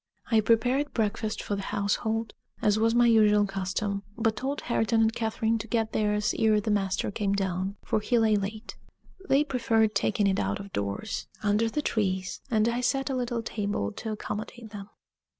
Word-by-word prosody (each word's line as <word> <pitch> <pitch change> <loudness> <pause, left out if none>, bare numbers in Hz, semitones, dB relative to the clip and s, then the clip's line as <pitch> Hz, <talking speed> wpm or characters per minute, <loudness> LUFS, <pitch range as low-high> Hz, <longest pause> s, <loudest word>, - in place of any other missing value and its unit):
I 225 - +5
prepared 245 +6 +2
breakfast 220 0 -1
for 205 - -2
the 200 - -4
household, 215 +3 -1 0.3
as 210 0 +2
was 225 +1 +3
my 240 0 +5
usual 210 -3 +5
custom, 195 +1 -2 0.2
but 225 -1 +1
told 270 +6 -3
Hareton 225 -1 +1
and 225 0 +3
Catherine 225 0 0
to 215 - -6
get 225 -1 -1
theirs 210 -1 +1
ere 220 -2 +4
the 210 +1 -2
master 195 -1 0
came 200 -1 -1
down, 190 0 -1
for - - +1
he 240 +3 +1
lay 220 -2 +4
late. 210 +2 -4 0.5
They 275 +2 +5
preferred 225 -6 +1
taking 205 0 +1
it 195 -1 +2
out 100 0 -1
of 200 -1 -9
doors, 100 - -3 0.2
under 210 +2 +2
the 300 +6 -2
trees, 190 -6 -1
and 220 -2 +2
I 235 +1 0
set 270 +2 0
a - - -1
little 240 -2 -2
table 205 - -2
to 220 - -5
accommodate 215 +2 -6
them. 205 -1 -8
215 Hz, 185 wpm, -27 LUFS, 200-230 Hz, 0.5 s, I